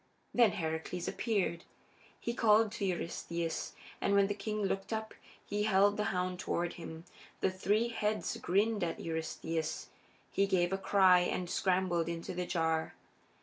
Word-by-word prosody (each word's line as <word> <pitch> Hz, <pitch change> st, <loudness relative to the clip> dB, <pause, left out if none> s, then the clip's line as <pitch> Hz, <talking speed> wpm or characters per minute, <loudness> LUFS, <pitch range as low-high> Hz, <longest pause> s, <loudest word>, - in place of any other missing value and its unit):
Then 235 Hz, -4 st, +5 dB
Heracles 160 Hz, +1 st, -3 dB
appeared. 195 Hz, -7 st, -1 dB, 0.6 s
He 235 Hz, -, -2 dB
called 220 Hz, -2 st, +4 dB
to 215 Hz, -3 st, -3 dB
Eurystheus, 170 Hz, -2 st, -3 dB, 0.3 s
and 200 Hz, -, +2 dB
when 200 Hz, 0 st, +6 dB
the 205 Hz, -, -1 dB
king 210 Hz, +1 st, -3 dB
looked 195 Hz, +1 st, -2 dB
up 220 Hz, 0 st, -3 dB, 0.3 s
he 205 Hz, +1 st, -2 dB
held 205 Hz, -1 st, +4 dB
the 210 Hz, -, -1 dB
hound 180 Hz, -1 st, -1 dB
toward 175 Hz, -1 st, -1 dB
him. 165 Hz, -1 st, -8 dB, 0.4 s
The 190 Hz, -, +2 dB
three 205 Hz, +5 st, +1 dB
heads 215 Hz, -1 st, -1 dB
grinned 210 Hz, 0 st, +1 dB
at 165 Hz, -, -2 dB
Eurystheus; 160 Hz, 0 st, -3 dB, 0.4 s
he 195 Hz, -, +2 dB
gave 180 Hz, -1 st, +2 dB
a -, -, +1 dB
cry 190 Hz, -2 st, +5 dB
and 180 Hz, 0 st, -1 dB
scrambled 180 Hz, -2 st, +1 dB
into 170 Hz, +2 st, -4 dB
the 180 Hz, 0 st, -3 dB
jar. 160 Hz, -2 st, 0 dB
190 Hz, 150 wpm, -33 LUFS, 170-210 Hz, 0.6 s, when